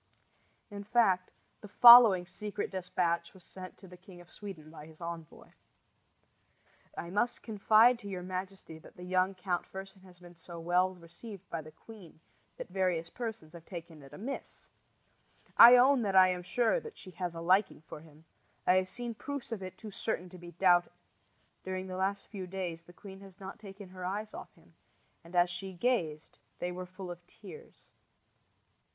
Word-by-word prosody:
In 200 0 -7
fact, 195 -4 +2 0.3
the 210 - -10
following 225 -4 +9
secret 205 +3 -5
despatch 175 -2 -2
was 185 - -16
sent 185 0 -11
to 190 - -14
the 180 0 -13
King 180 0 -15
of 175 -1 -16
Sweden 170 -7 -10
by 155 -1 -11
his 160 -1 -17
envoy: 170 -2 -8 1.5
I 170 - -6
must 220 +5 -1
confide 220 +2 +4
to 205 - -10
your 185 -2 -5
majesty 185 -3 -6
that - - -17
the 180 - -10
young 185 +1 +1
Count 180 -1 -2
Fersen 195 0 -10
has 185 -1 -17
been 175 -1 -15
so 170 0 -11
well 180 +2 +1
received 180 +3 -12
by 165 - -3
the 155 - -12
queen 190 -2 -15 0.4
that - - -8
various 180 -3 -1
persons 220 -10 -6
have 170 -1 -12
taken 165 -4 -9
it 135 -1 -14
amiss. 230 - -7 0.9
I 240 +2 +11
own 260 +1 +5
that 200 -3 -1
I 185 -1 +7
am 180 -1 -2
sure 240 - +1
that 455 -2 -11
she 185 - -11
has 180 -1 -5
a - - -6
liking 185 +1 +2
for - - -9
him. 155 0 -18 0.4
I 180 - +5
have 185 0 0
seen 240 +2 -5
proofs 280 +3 -7
of 220 -4 -4
it 185 0 -8
too 215 +1 -9
certain 190 -3 -3
to 180 0 -12
be 175 0 -11
doubted. 175 0 +3 0.7
During 185 0 -4
the 185 -1 -6
last 195 +1 -1
few 190 -4 -7
days 180 -3 -5
the 170 - -17
queen 190 +2 -12
has 195 0 -15
not 195 +1 -9
taken 200 -2 -11
her 185 0 -10
eyes 205 +4 -4
off - - -9
him, - - -24 0.5
and 170 +2 -12
as 175 0 +4
she 190 +2 -6
gazed 170 -7 -2 0.2
they 180 - -3
were 180 0 -7
full 185 0 -8
of 175 0 -10
tears. 460 - -14
185 Hz, 185 wpm, -31 LUFS, 175-200 Hz, 1.5 s, I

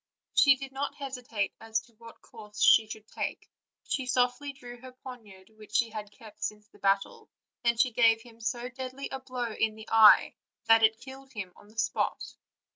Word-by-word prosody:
She 275 -1 +6
did 270 0 -8
not 275 +2 -3
hesitate 250 -7 -4
as 225 0 -1
to 235 +1 -23
what 230 +1 -15
course 210 -1 -12
she 220 - +6
should 215 0 -9
take: - - -5 0.4
she 260 -2 -2
softly 255 +2 +1
drew 245 -3 -11
her 255 0 -11
poniard, 220 -7 -12
which 215 -1 -13
she 230 -1 +2
had 210 -1 -6
kept 215 -1 -15
since 210 0 -4
the - - -21
battle, 195 0 0 0.3
and 235 -1 +2
gave 230 -2 +4
him 230 -1 -17
so 240 +2 -2
deadly 260 +1 -7
a 265 - -5
blow 250 -3 -4
in 215 0 0
the 220 0 -12
eye 220 -2 +7 0.3
that 225 0 +6
it 220 0 +4
killed 265 +1 -12
him 190 -5 -6
on 205 - -18
the 215 +2 -21
spot. 220 - -1
230 Hz, 190 wpm, -29 LUFS, 215-255 Hz, 0.4 s, eye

